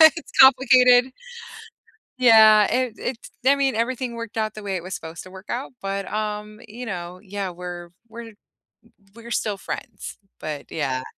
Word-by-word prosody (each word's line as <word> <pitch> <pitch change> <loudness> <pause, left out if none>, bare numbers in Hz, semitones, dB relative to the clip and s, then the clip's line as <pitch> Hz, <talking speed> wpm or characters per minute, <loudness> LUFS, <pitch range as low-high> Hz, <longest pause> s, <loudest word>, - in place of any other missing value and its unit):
It's 330 - -9
complicated. 255 -1 +7 1.1
Yeah, 220 -4 +7
it 255 -2 0
it's 245 -1 -6
I 280 +1 +5
mean, 270 -3 0
everything 240 +1 -2
worked 230 -1 -7
out 215 -1 -1
the 215 - -10
way 195 -1 -3
it 175 - -4
was 185 +1 -7
supposed 165 0 -8
to 185 - -14
work 190 +2 -13
out 255 +3 -4
but, 195 0 -4
um, 210 0 -4
you 235 +4 -8
know 180 -3 -6
Yeah, 200 -1 -5
we're 175 0 -8 0.2
we're 230 0 -10 0.8
we're 235 0 -12
still 210 -3 -1
friends, - - -7 0.2
but 150 -2 -6
yeah. 130 -4 -2
215 Hz, 160 wpm, -23 LUFS, 190-245 Hz, 1.1 s, complicated